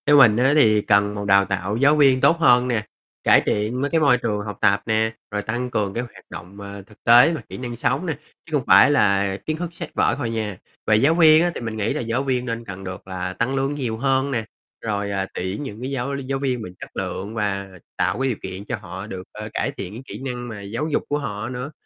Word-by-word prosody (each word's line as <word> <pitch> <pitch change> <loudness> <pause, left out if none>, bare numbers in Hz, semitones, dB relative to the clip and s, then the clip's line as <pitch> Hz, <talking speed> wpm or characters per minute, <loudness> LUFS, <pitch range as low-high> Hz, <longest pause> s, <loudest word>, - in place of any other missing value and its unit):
Theo 145 0 +6
mình 110 -6 +7
á 130 +3 +4
thì 110 -8 +5
cần 100 0 +2
một 100 0 -4
đào 100 0 +5
tạo 100 +2 -2
giáo 140 +4 +4
viên 135 -3 +4
tốt 165 - +5
hơn 125 -5 +5
nè, 115 -4 -1 0.4
cải - - +6
thiện 110 +5 -1
mấy 145 - 0
cái 165 - +2
môi 140 -5 +5
trường 110 -4 -2
học 105 -2 -6
tập 100 +1 +3
nè, 110 0 +1 0.2
rồi 105 0 -1
tăng 120 +4 -3
cường 105 -4 -1
cái 120 - -2
hoạt 120 - -13
động, 95 +5 -10
à, 100 0 -8
thực 105 - -21
tế 120 +7 +7
và 160 - -4
kỹ - - -7
năng 120 -2 -5
sống 125 +8 0
nè, 165 - -1 0.3
chứ - - -16
không 140 -5 +1
phải 100 +9 +7
là 100 -7 +2
kiến 155 0 -2
thức 175 0 -5
sách - - -7
vở - - +2
thôi 125 -5 -2
nha. 110 -4 -3 0.3
Về 110 - +5
giáo 135 +9 +4
viên 160 -1 +6
á 175 - +1
thì - - -5
mình 110 -2 -4
nghĩ 105 - 0
là - - -2
giáo 120 +3 -1
viên 130 -2 -1
nên 115 -1 -4
cần 95 -1 -8
được 95 0 -8
là 90 -1 -4
tăng 120 +7 -1
lương 135 +2 -1
nhiều 120 -6 -3
hơn 135 +2 +1
nè, 115 -4 -1 0.4
rồi, 100 -2 -2
à, 95 -1 -2
tuyển 95 +8 -4
những 110 -5 -7
cái 130 +2 -4
giáo 135 +1 -2
giáo 135 0 -3
viên 130 -3 -1
mà 110 - -6
chất - - -8
lượng 105 +4 -4
và 100 -3 -2 0.3
tạo - - 0
cái 135 - +1
điều 120 - -2
kiện 95 +1 -7
cho 120 - -2
họ 95 +1 -7
được, 95 -4 -7
ơ, 105 0 -7
cải - - -1
thiện 90 - -7
cái 115 - -8
kỹ - - -8
năng 125 -2 -4
mà 110 -3 -7
giáo 115 +9 -3
dục - - 0
của 145 - +1
họ 110 -5 -4
nữa. 125 +3 -5
115 Hz, 265 wpm, -22 LUFS, 100-135 Hz, 0.4 s, mình